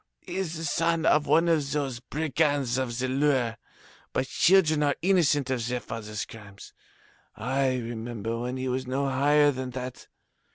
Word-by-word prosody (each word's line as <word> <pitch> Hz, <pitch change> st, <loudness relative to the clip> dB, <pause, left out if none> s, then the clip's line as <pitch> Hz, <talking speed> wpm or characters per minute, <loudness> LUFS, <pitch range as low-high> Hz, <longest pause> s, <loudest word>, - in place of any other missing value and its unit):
He 180 Hz, 0 st, -7 dB
is 170 Hz, -4 st, -2 dB
the 165 Hz, -, -6 dB
son 165 Hz, +1 st, +1 dB
of 150 Hz, -2 st, +3 dB
one 165 Hz, +4 st, +4 dB
of 150 Hz, -5 st, +1 dB
those 135 Hz, -5 st, -2 dB
brigands 145 Hz, -3 st, 0 dB
of 120 Hz, -3 st, -2 dB
the 130 Hz, +1 st, -1 dB
Loire, 130 Hz, -4 st, +1 dB, 0.6 s
but 130 Hz, -, 0 dB
children 165 Hz, -4 st, +4 dB
are 145 Hz, -2 st, +2 dB
innocent 155 Hz, -8 st, +3 dB
of 120 Hz, -3 st, -1 dB
their 125 Hz, 0 st, -1 dB
fathers' 105 Hz, -2 st, -5 dB
crimes. 105 Hz, -2 st, -13 dB, 0.6 s
I 130 Hz, +3 st, 0 dB
remember 115 Hz, -1 st, -4 dB
when 125 Hz, +2 st, -3 dB
he 130 Hz, 0 st, -3 dB
was 130 Hz, 0 st, -2 dB
no 135 Hz, +2 st, -1 dB
higher 145 Hz, +2 st, +4 dB
than 130 Hz, -1 st, -5 dB
that. 125 Hz, -1 st, -7 dB
130 Hz, 165 wpm, -27 LUFS, 120-150 Hz, 0.6 s, one